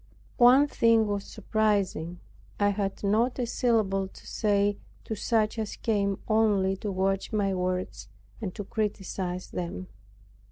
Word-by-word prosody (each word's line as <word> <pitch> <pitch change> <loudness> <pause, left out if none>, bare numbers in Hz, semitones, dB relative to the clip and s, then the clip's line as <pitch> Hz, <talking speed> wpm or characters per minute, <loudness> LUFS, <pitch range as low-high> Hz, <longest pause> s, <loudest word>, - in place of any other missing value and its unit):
One 255 +4 +7
thing 230 -5 +3
was 205 -1 -2
surprising; 200 -6 -1 0.4
I 205 0 +4
had 200 -1 -2
not 220 +5 +2
a 250 - 0
syllable 215 -5 +1
to - - -16
say 205 -1 +1 0.2
to - - -4
such 220 +1 0
as 215 -2 -3
came 200 -3 0
only 205 -3 +3
to 205 +1 -4
watch 195 +1 -1
my 200 -3 +1
words, 185 0 -3 0.3
and 200 -4 -3
to 205 - -4
criticize 190 -3 -3
them. 180 +1 -5
205 Hz, 135 wpm, -28 LUFS, 190-220 Hz, 0.4 s, One